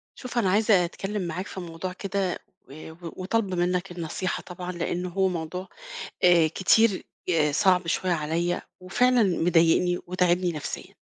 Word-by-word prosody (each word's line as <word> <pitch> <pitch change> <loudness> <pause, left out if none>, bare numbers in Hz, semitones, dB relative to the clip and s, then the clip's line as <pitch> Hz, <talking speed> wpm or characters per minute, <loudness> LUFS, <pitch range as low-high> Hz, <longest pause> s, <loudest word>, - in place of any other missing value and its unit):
شوف 250 -1 -7
أنا 200 -6 +3
عايزة 200 -2 +4
أتكلم 195 +4 -4
معاك 180 +4 -4
في 190 - -7
موضوع 175 +1 -6
كده 195 -1 -2 0.4
آآ 155 +2 -9
و 160 - -15 0.2
وطالبة 195 -1 0
منّك 180 +1 0
النصيحة 175 +2 -3
طبعًا، 180 0 -6
لأن 175 0 -3
هو 190 +2 +1
موضوع 180 +1 -4 0.6
آآ 175 -2 +6
كتير 195 +5 +3 0.3
آآ 155 -4 +2
صَعب 180 +2 +3
شوية 180 +2 0
عليَّ، 170 +2 -1 0.2
وفعلًا 245 +7 +3 0.2
مضايقني 175 +1 +3
وتاعبني 180 0 +1
نفسيًا. 150 -3 -6
180 Hz, 145 wpm, -26 LUFS, 170-190 Hz, 0.6 s, آآ